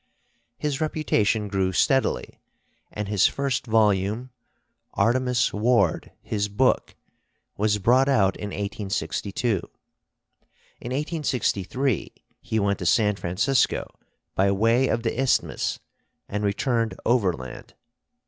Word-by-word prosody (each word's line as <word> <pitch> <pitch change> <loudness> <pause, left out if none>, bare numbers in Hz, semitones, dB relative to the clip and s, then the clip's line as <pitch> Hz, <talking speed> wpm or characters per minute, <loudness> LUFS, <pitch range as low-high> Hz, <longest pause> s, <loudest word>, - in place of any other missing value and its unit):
His 150 0 -2
reputation 110 -9 +1
grew 95 -2 0
steadily, 135 - +1 0.5
and 105 -1 -4
his 100 -2 +4
first 140 -2 -2
volume, 110 +2 +1 0.6
'Artemus 125 0 +2
Ward, 105 -5 +1
His 105 -1 -1
Book,' 100 - +1 0.6
was 105 0 +1
brought 125 +7 +3
out 95 -8 +3
in 105 - -6
1862. 100 +2 -3 1.3
In 120 - -7
1863 130 - -1 0.3
he 110 - -1
went 100 -1 0
to 90 - -4
San 105 +2 +3
Francisco 105 +9 +1 0.5
by 100 +1 +2
way 115 +6 +3
of 115 -1 -1
the 115 +2 -1
Isthmus 135 - 0 0.5
and 105 +1 -3
returned 115 +3 0
overland. 90 - -1
110 Hz, 105 wpm, -25 LUFS, 100-125 Hz, 1.3 s, his